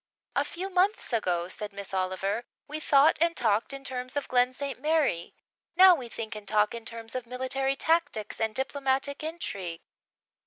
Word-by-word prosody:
"A - - +3
few 380 +3 -5
months 375 - +1
ago," 180 -6 +1
said 205 +3 -5
Miss 200 -1 -8
Oliver, 190 +4 -1 0.2
"we 300 +1 -4
thought 290 0 +4
and 335 0 +2
talked 220 +1 +2
in 275 0 -7
terms 255 0 -4
of 285 - -2
Glen 250 0 +3
St. 275 +1 -5
Mary. 300 - +1 0.4
Now, 370 +1 +9
we 260 -8 -4
think 225 -1 -5
and 210 -2 -9
talk 210 +1 +2
in 230 -1 -7
terms 230 -1 -6
of 255 -2 -4
military 260 +2 0
tactics 295 -12 0
and 220 -1 0
diplomatic 275 +1 -1
intrigue." 200 - -4
250 Hz, 170 wpm, -28 LUFS, 215-285 Hz, 0.4 s, Now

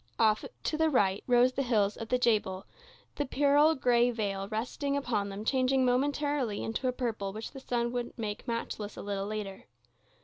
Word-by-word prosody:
Off 215 -1 +3 0.2
to 305 - -1
the 320 0 +3
right 200 -8 +2
rose 250 0 +5
the 275 - -1
hills 215 -6 +1
of 225 -1 -7
the 250 - +3
Jebel, 210 -6 +1 0.5
the 290 - 0
pearl 290 +3 +4
gray 245 -2 +3
veil 200 -4 -2
resting 245 +6 -2
upon 220 -7 -1
them 200 +2 -6
changing 260 +1 +2
momentarily 270 -2 0
into 225 +4 -2
a - - +2
purple 225 -6 -3
which 215 +2 -7
the 270 - -9
sun 240 -2 -1
would 245 0 -4
make 215 +1 -5
matchless 225 -3 -4
a - - -6
little 200 -1 -3
later. 205 -2 -5
235 Hz, 180 wpm, -30 LUFS, 210-260 Hz, 0.5 s, rose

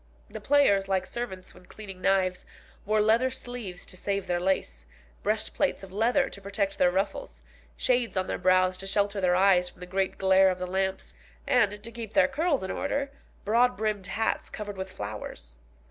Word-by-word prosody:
The - - -7
players, 265 -10 +4
like 190 -1 0
servants 190 -6 -6
when 180 - -17
cleaning 195 -4 -10
knives, 185 -1 +1 0.4
wore 215 0 +3
leather 225 +4 +3
sleeves 245 -8 -7
to - - -8
save 200 +1 -2
their 175 -1 0
lace, 65 - -1 0.3
breastplates 215 +4 -1
of 190 -1 -11
leather 240 +7 +2
to 200 - -9
protect 200 0 -2
their 180 - +5
ruffles, 190 +3 -3 0.3
shades 245 -5 +1
on 185 - +1
their - - -3
brows 185 0 +3
to 195 - -7
shelter 200 0 0
their 180 -1 +3
eyes 185 -1 +4
from - - -21
the 180 - -7
great 190 +1 -1
glare 190 0 +5
of 185 - -1
the 185 - -3
lamps, 190 +1 -2 0.3
and, 210 -4 +2
to 230 - -7
keep 230 -2 -7
their 285 -2 +5
curls 290 - 0
in 190 - -3
order, 280 -1 -2 0.3
broad 240 +4 +3
brimmed 210 -3 -2
hats 220 +3 -1
covered 205 -1 -6
with 190 0 -5
flowers. 100 - -7
195 Hz, 185 wpm, -27 LUFS, 185-225 Hz, 0.4 s, their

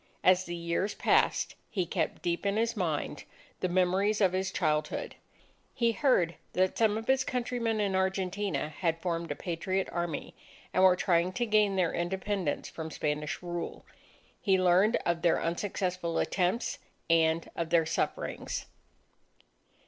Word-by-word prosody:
As 185 0 +5
the 175 - -4
years 170 +4 -1
passed, - - +2 0.2
he 185 -4 -1
kept - - -2
deep 175 -1 -1
in 200 +1 0
his 230 +1 +1
mind 160 -6 -2 0.4
the 185 - 0
memories 185 +4 +2
of 190 -3 +3
his 190 +1 0
childhood. 150 0 -1 0.6
He 235 -2 +3
heard 215 - +2 0.2
that 185 0 +2
some 220 -2 +3
of 225 - -5
his 265 +1 +3
countrymen 240 -3 -1
in 200 -2 +1
Argentina 190 -2 -1
had 165 +1 -1
formed 170 -1 -2
a - - -2
Patriot 185 +2 -2
Army, 175 -3 -3 0.4
and 185 - +3
were 185 -1 +7
trying 175 -1 +2
to 240 - 0
gain 210 -3 +3
their 180 -3 +1
independence 190 -1 -2
from 160 -1 -6
Spanish 150 +1 -3
rule. 175 -1 -5 0.6
He 190 -3 +3
learned 185 +5 +4
of 170 -1 0
their 170 - +3
unsuccessful 180 -1 -2
attempts 185 +5 0 0.3
and 165 0 +3
of 165 -1 -2
their 165 -1 +4
sufferings. 165 - -2
185 Hz, 150 wpm, -30 LUFS, 170-200 Hz, 0.6 s, were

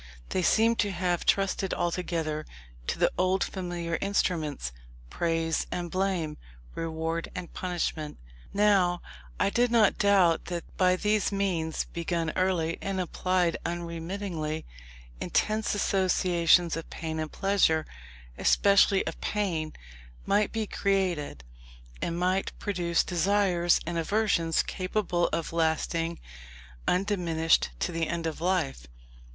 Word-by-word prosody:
They 185 - 0
seemed 225 +5 +3
to 205 - +2
have 180 -2 -1
trusted 195 -1 +1
altogether 165 -3 -2 0.4
to - - -1
the - - +3
old 185 +1 +2
familiar 175 -3 -3
instruments, 160 - -1 0.4
praise 165 -1 0
and 175 -1 -3
blame, 185 -5 -1 0.4
reward 165 0 -3
and 180 -2 -6
punishment. 170 -4 -3 0.3
Now, 195 -4 +3 0.4
I 200 - +2
did 245 +2 +3
not 230 -3 +4
doubt 190 -5 +4
that 175 -1 -4
by 185 -1 +4
these 210 +2 +1
means, 180 -5 -1
begun 170 -1 -2
early, 175 -3 0
and 195 -1 -2
applied 180 -1 0
unremittingly, 170 -1 -4 0.5
intense 215 0 0
associations 180 -3 +3
of 165 - -6
pain 160 -1 -4
and 155 -1 -3
pleasure, 195 -5 +2 0.5
especially 200 -1 +4
of - - -5
pain, 170 -7 -1 0.5
might 205 +1 +2
be 225 -1 -1
created, 185 - -1 0.6
and 170 - -2
might 185 +2 0
produce 175 -4 0
desires 180 -1 +2
and 170 0 -2
aversions 170 -3 +1
capable 185 -2 -1
of 165 0 -3
lasting 165 +1 0 0.7
undiminished 175 -4 +2
to - - 0
the 165 -1 -1
end 170 -1 -3
of 160 -1 -3
life. 165 - 0
175 Hz, 120 wpm, -28 LUFS, 165-195 Hz, 0.7 s, not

